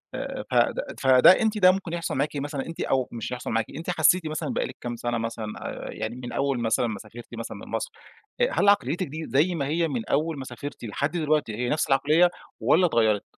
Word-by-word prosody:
آآ - - -4
ف - - -4
فد - - +4 0.2
فده 130 +4 +7
أنتِ 220 -1 +1
ده 185 -2 +7
ممكن 185 -3 -4
يحصل 170 -1 -2
معاكِ 145 +2 -1
مثلًا، 145 -1 -3
أنتِ 165 - -7
أو 130 -2 +1
مش 115 +1 -5
هيحصل 125 - -5
معاكِ، 115 0 +1
أنتِ 165 +2 -6
حسيتِ 180 -1 +3
مثلًا 155 0 -3
بقي - - 0
لِك - - -10
كام 120 -1 -4
سنة 120 0 -2
مثلًا، 115 -1 -4 0.2
آآ - - -6
يعني 110 +2 -4
من 125 -1 -7
أول 135 -2 0
مثلًا 115 +1 +1
ما 105 -3 -4
سافرتِ 115 +2 -11
مثلًا 115 - -6
من - - -11
مصر، - - -2 0.5
أ 485 - +5
هل 200 - +3
عقليتِك 175 -1 +2
دي 155 +3 -6
زي 150 +8 +2
ما 140 -3 -2
هي 165 +3 +1
من 125 -7 -3
أول 155 +2 0
ما 130 - -6
سافرتِ 130 +2 -8
لحد 140 +7 -2
دلوقتي 155 -9 0
هي 120 +1 -2
نفس 150 - +1
العقلية 155 +6 +4 0.3
والّا 155 +10 +4
إتغيرِت؟ 110 - +2
140 Hz, 230 wpm, -26 LUFS, 120-165 Hz, 0.5 s, فده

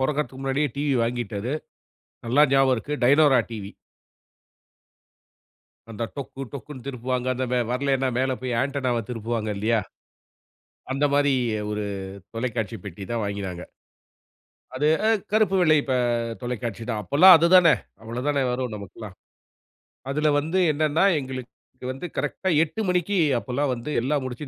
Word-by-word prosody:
பொறக்கறதுக்கு 135 -1 -1
முன்னாடியே 135 +2 0
டிவி 145 -1 0
வாங்கிட்டாரு. 120 -1 -3 0.7
நல்லா 130 +6 +4
ஞாபகம் 135 -1 +4
இருக்கு. 145 +6 -5
Dyanora 140 0 +5
TV. 100 -3 -7 2.2
அந்த 115 +1 -5
டொக்கு 135 -1 -6
டொக்குன்னு 135 -1 -9
திருப்புவாங்க. 125 -1 -3
அந்த 130 +1 -2
வெ 125 - +2
வரலேன்னா 135 0 +1
மேல 130 0 +1
போய் 125 -2 -1
ஆன்டனாவ 130 -4 -1
திருப்புவாங்க 115 -2 -3
இல்லையா? 110 +2 +1 1.1
அந்தமாரி 145 0 +2 0.4
ஒரு 105 0 -2 0.5
தொலைக்காட்சிப் 115 -3 -3
பெட்டி 100 0 -7
தான் 115 - -1
வாங்கினாங்க. 95 -3 -4 1.1
அது 150 - +1 0.2
அ - - +4 0.2
கருப்பு 215 -3 +3
வெள்ளை 155 -3 +5
இப்ப 130 - -1 0.5
தொலைக்காட்சி 120 -2 -4
தான். 110 - -2
அப்போல்லாம் 170 - +8
அது 165 +1 +3
தானே! 170 -4 +7 0.3
அவ்வளவு 120 +5 -5
தானே 140 -2 +1
வரும் 125 -2 -3
நமக்குல்லாம். 100 0 -10 0.9
அதில 150 +2 +1
வந்து 160 +6 -1
என்னன்னா, 155 +3 +1 0.2
எங்களுக்கு 130 -1 -9
வந்து 135 +7 -6
கரெக்ட்டா 190 - -2
8:00 195 +7 -4
மணிக்கு 180 +2 +1 0.2
அப்பல்லாம் 135 +3 -1
வந்து 120 +5 -6
எல்லாம் 140 +1 0
முடிச்சு 130 +4 -6
130 Hz, 130 wpm, -24 LUFS, 115-145 Hz, 2.2 s, அப்போல்லாம்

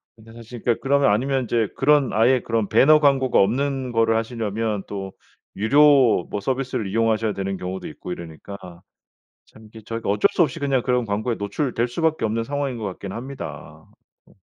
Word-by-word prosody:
근데 115 0 -16
사실 115 0 -10
그러니까 120 -2 0
그러면 140 -3 +3
아니면 130 +5 0
이제 115 -2 0
그런 145 -1 +3
아예 120 +3 +3
그런 115 -3 -1
배너 155 +3 +6
광고가 135 -3 +3
없는 130 +4 0
거를 115 0 +2
하시려면 110 -2 -3
또 95 -1 -6 0.5
유료 135 - +5
뭐 105 - -3
서비스를 130 -3 -2
이용하셔야 110 0 +1
되는 95 0 -3
경우도 95 +1 -6
있고 80 - -9
이러니까 85 +4 -9 0.9
참 110 0 -18
이게 110 +1 -13
저희가 115 -2 -4
어쩔 105 0 +3
수 - - +2
없이 165 0 +1
그냥 135 -3 +1
그런 125 -2 0
광고에 110 +3 -2
노출될 120 +3 -2
수밖에 160 +1 -1
없는 115 +1 -1
상황인 140 -1 -3
것 110 - -7
같긴 95 0 -6
합니다. 130 +3 -8 0.4
어. - - -23
115 Hz, 395 characters per minute, -22 LUFS, 105-135 Hz, 0.9 s, 배너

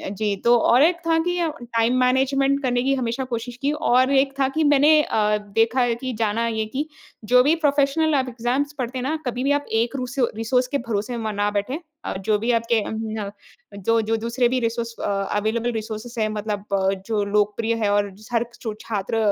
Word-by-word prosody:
जी 205 0 -1
तो 240 0 +6
और 245 +4 +4
एक 340 +1 +3
था 325 0 +3
कि 355 0 0 0.2
टाइम 235 +1 +1
मैनेजमेंट 270 +2 +2
करने 245 -1 +1
की 275 +1 +2
हमेशा 245 0 -2
कोशिश 240 0 -5
की 280 +1 +1
और 255 -2 +2
एक 270 0 +3
था 265 - +3
कि 315 +3 0
मैंने 295 +2 +5
अ, 210 -1 +1 0.2
देखा 225 +3 +3
है 240 -1 +2
कि 255 +1 -5
जाना 225 +1 0
है 220 -1 -1
कि 275 +8 -3 0.4
जो 250 +3 +5
भी 305 +4 +3
प्रोफ़ेशनल 295 0 +2
आप 260 -2 0
एग्ज़ाम्स 250 +5 -1
पढ़ते 250 +1 -3
हैं 250 - -3
ना 305 +4 -1
कभी-भी 250 +3 -1
आप 285 0 +1
एक 230 +4 0
रूसो 250 -1 -1
रिसोर्स 250 +3 +1
के 280 - -1
भरोसे 225 +3 -2
में 220 -1 -3
ना 205 +1 0
बैठे, 210 +10 -2 0.3
अ, - - -2
जो 210 +2 +1
भी 235 +3 0
आपके 230 -1 +2
उम, 220 -2 -4 0.5
जो 230 +1 +3
जो 225 +1 0
दूसरे 235 +2 +1
भी 255 0 +1
रिसोर्स 230 0 -2
अवेलेबल 210 +4 -1
रिसोर्सेज़ 225 +2 -5
हैं 215 - +2
मतलब 210 -1 -4 0.4
जो 215 -2 0
लोकप्रिय 210 +2 +1
है 205 - +2
और 205 0 +2 0.3
हर 235 0 +2 0.2
सु 220 -3 -3
छात्र 210 0 -3
235 Hz, 200 wpm, -23 LUFS, 220-265 Hz, 0.5 s, तो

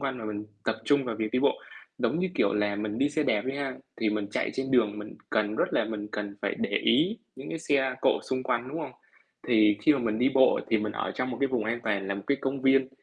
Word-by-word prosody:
quanh 135 -2 -2
mà 115 - -6
mình 105 0 -4 0.2
tập 110 - 0
trung 145 +2 +3
vào 115 -3 -3
việc 110 -1 -2
đi 125 - +2
bộ. 140 - +2 0.4
Giống 160 - +1
như, 185 +1 +1
kiểu 100 - +2
là, 105 -1 +1
mình 105 +1 -3
đi 140 - +3
xe 150 +1 0
đạp 105 -7 +1
đi 135 +1 -2
ha, 140 -2 -2 0.2
thì 110 - +1
mình 105 -1 -1
chạy - - -1
trên 135 0 -2
đường 110 -5 +3
mình 105 0 -8 0.2
cần 105 0 +1
rất - - 0
là - - +2
mình 105 -1 -5
cần 105 -1 -4
phải - - 0
để - - -1
ý 170 - +2 0.2
những 135 +2 -8
cái 165 - -4
xe 135 -4 +1
cộ - - +3
xung 130 0 -2
quanh, 125 -1 -1
đúng 155 +5 -5
không? - - -5 0.6
Thì 105 -3 +5
khi 155 - +6
mà 140 - +1
mình 110 -3 -1
đi 125 +3 +4
bộ 130 -1 +5
thì 110 - +4
mình 105 0 -2
ở - - -2
trong 125 0 -2
một 120 - -4
cái 140 - +4
vùng 125 -5 -1
an 115 +2 -1
toàn 100 -3 0
là 100 - -1
một 100 - -6
cái 140 - +2
công 135 0 -2
viên, 135 -1 +4
120 Hz, 280 wpm, -28 LUFS, 105-135 Hz, 0.6 s, khi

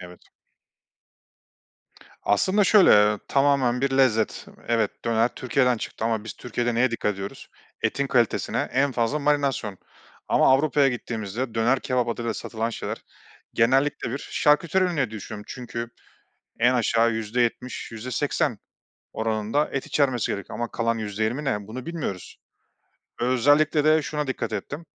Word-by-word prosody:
Evet. 90 -1 -12 2.0
Aslında 190 - +2
şöyle, 205 -1 +6
eee, 105 0 +5
tamamen 135 -3 +2
bir 140 +1 +1
lezzet. 130 -5 +1 0.2
Evet, 115 -3 0
döner 115 0 +2
Türkiye'den 125 -1 +1
çıktı 110 - -6
ama 110 -2 -1
biz 110 - -6
Türkiye'de 120 0 -3
neye 125 +2 +2
dikkat 105 -3 -1
ediyoruz? 100 +1 -8 0.3
Etin 140 - 0
kalitesine 120 -4 0
en 135 +1 +2
fazla 120 +4 0
marinasyon 140 -9 0 0.5
ama - - +4
Avrupa'ya 140 0 +3
gittiğimizde 115 -1 -4
döner 120 +4 +2
kebap 125 -2 0
adıyla 115 -1 -2
satılan 115 0 -3
şeyler - - -5 0.6
genellikle 135 +2 +2
bir 135 - -3
şarküteri 165 +7 +2
ürünü 180 -2 -1
diye 135 -6 0
düşünüyorum 105 0 -8
çünkü 120 -2 -6 0.7
en 125 +2 +4
aşağı 115 -1 +2
%70 115 +3 -2
%80 125 +1 -1 0.6
oranında 110 +5 -1
et 135 - -3
içermesi 130 -5 +1
gerek 100 -2 -5
ama 120 0 -4
kalan 115 0 0
%20 110 +5 -2
ne, 105 -7 -2
bunu 125 +3 -7
bilmiyoruz. 155 - -5 0.8
Özellikle 145 +5 +3
de 155 0 +4
şuna 150 0 -3
dikkat 130 - -3
ettim 150 +4 -5
120 Hz, 135 wpm, -24 LUFS, 110-140 Hz, 2.0 s, şöyle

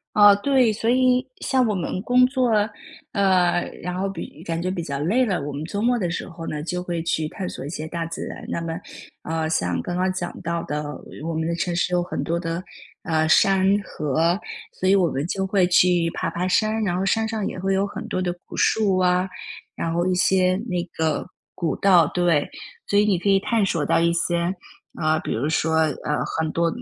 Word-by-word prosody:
啊， 205 -1 +8
对， 250 +2 +3
所 225 +2 0
以 255 0 +3 0.2
像 260 -2 +2
我 210 - 0
们 185 0 -3
工 250 +2 +5
作， 255 -1 +1 0.6
呃， 185 -3 +3 0.2
然 180 +1 -4
后 195 - 0
比 170 -3 -8
感 165 -2 -3
觉 180 - -2
比 185 -2 -2
较 140 -4 -4
累 205 - +2
了， 195 -7 -1
我 145 +1 -5
们 145 +2 -5
周 200 +4 -3
末 245 +3 +2
的 175 -3 -1
时 175 - -4
候 165 -1 -8
呢， 150 - -3
就 180 +2 -3
会 175 -2 -3
去 160 -2 0
探 185 +3 -5
索 - - -7
一 - - -5
些 155 -1 -5
大 170 +1 -3
自 165 - -6
然。 - - -8
那 - - -2
么， 165 -1 -4 0.5
呃， 160 0 -2
像 90 - 0
刚 175 - -4
刚 185 +1 +1
讲 180 -1 -4
到 170 -1 -2
的， 150 +1 -3 0.4
我 165 - -2
们 160 0 -1
的 170 - -1
城 175 +1 -2
市 175 +1 0
有 175 0 +2
很 175 - -4
多 170 0 -1
的， 165 -1 -3 0.4
呃， 160 -1 +1
山、 190 +3 +4 0.2
河， 160 +2 0 0.4
所 185 - +2
以 195 - +6
我 180 -3 +3
们 140 -1 -2
就 190 +1 -1
会 190 -1 +2
去 175 -1 +4
爬 - - -2
爬 180 +1 -2
山， 215 +3 +1
然 180 -4 0
后 190 - -1
山 220 +3 +1
上 220 -2 -2
也 - - -4
会 190 +1 -1
有 195 +1 +1
很 215 +2 -7
多 185 - -1
的 180 -1 -1
古 - - -9
树 200 -4 +2
啊， 180 0 +2 0.5
然 165 0 -2
后 170 +1 +1
一 185 - +2
些 185 0 +3
那 180 -3 -1
个 160 -1 0 0.3
古 170 -3 -1
道， 180 -5 +5
对。 175 -5 +2 0.4
所 205 - +3
以 205 - +5
你 200 -3 +3
可 180 +4 -2
以 195 -1 +5
探索 195 -7 0
到 - - +3
一 170 0 +3
些， 170 +1 0 0.4
啊， 155 -1 +1
比 - - -4
如 125 +7 -1
说， 160 +1 +1
呃， 150 -1 0 0.2
很 160 -1 -1
多 170 +1 +1
180 Hz, 240 characters per minute, -23 LUFS, 165-195 Hz, 0.6 s, 啊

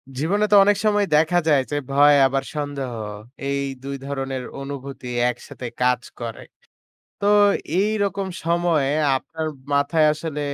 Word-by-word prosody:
জীবনে 190 +10 +1
তো - - +7
অনেক 205 0 +3
সময় 205 -1 +3
দেখা 160 +3 +3
যায় 145 -3 +4
যে - - -1 0.2
ভয় 145 +1 +6
আবার 135 0 -1
সন্দেহ, 145 -3 -3 0.6
এই 140 0 0 0.2
২ 140 0 -4
ধরনের 135 -2 -4 0.2
অনুভূতি 140 -2 -7 0.2
একসাথে 125 +1 -7
কাজ 125 -1 +2 0.2
করে। 115 -2 -6 0.8
তো 200 - -1 0.5
এইরকম 200 -1 0 0.2
সময়ে 170 -5 +1 0.2
আপনার 160 +4 -5 0.3
মাথায় 145 +2 +3
আসলে 155 -1 -5
145 Hz, 130 wpm, -22 LUFS, 135-170 Hz, 0.8 s, তো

